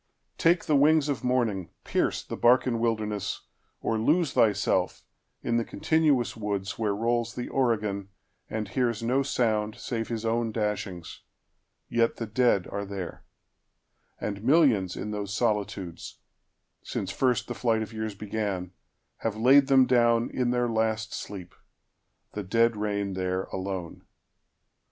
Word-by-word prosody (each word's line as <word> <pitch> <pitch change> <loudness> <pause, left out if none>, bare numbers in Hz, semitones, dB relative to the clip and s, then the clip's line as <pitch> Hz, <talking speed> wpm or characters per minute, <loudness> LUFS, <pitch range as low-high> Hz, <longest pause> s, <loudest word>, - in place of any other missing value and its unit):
—Take 170 +1 +3
the 155 - +1
wingsOf 145 -3 +3
morning, 115 -8 0
pierce - - 0
the - - -6
Barcan 120 -1 +3
wilderness, 105 -3 -2 0.4
Or 110 - 0
lose 155 +5 +2
thyself 105 -3 +2 0.4
in 115 - +1
the 115 - +1
continuous 150 -3 +1
woodsWhere 105 0 -2
rolls 120 0 0
the 125 - -4
Oregon, 105 -6 0 0.4
and 110 -1 -3
hears 115 -3 0
no 125 +4 +2
sound, 110 -5 0
Save 115 -2 -4
his 115 -1 -4
own 115 0 0
dashings,—yet 105 +2 -4
the 115 - -4
dead 110 -3 +2
are 100 - -3
there:And 100 +1 -9
millions 125 - +4
in 105 - -4
those 100 -1 -4
solitudes, 100 -6 -2 0.6
since 95 0 -4
firstThe 125 -1 0
flight 115 -2 +1
of 110 - -9
years 110 -1 -4
began, 100 -3 -3 0.5
have 110 -1 -3
laid 135 +4 +6
them 135 -2 +6
downIn 120 0 +2
their 120 0 +1
last 110 -1 -1
sleep—the 100 +2 -10
dead 115 +4 +2
reign 100 -2 -2
there 95 0 -1
alone. 95 -3 -4
110 Hz, 125 wpm, -27 LUFS, 100-120 Hz, 0.6 s, laid